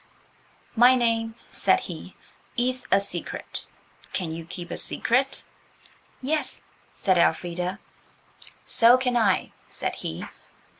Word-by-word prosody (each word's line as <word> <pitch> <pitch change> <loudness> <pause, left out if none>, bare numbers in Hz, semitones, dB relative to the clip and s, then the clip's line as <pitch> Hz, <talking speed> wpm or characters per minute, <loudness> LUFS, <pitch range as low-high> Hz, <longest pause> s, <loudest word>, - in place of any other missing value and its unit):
"My 245 +2 +7
name," 225 -2 +1 0.2
said - - +3
he, - - -8 0.4
"is 250 +1 0
a 195 - +6
secret. 200 - -5 0.5
Can 170 -4 -2
you 165 0 -6
keep 175 -1 -7
a - - -3
secret?" 265 +3 +1 0.8
"Yes," 305 +4 -1 0.3
said 185 -3 +2
Elfrida. 180 +2 +1 0.9
"So 235 +2 +6
can 255 -1 0
I," 230 -2 +2 0.2
said - - -3
he. - - -5
230 Hz, 110 wpm, -26 LUFS, 180-250 Hz, 0.9 s, My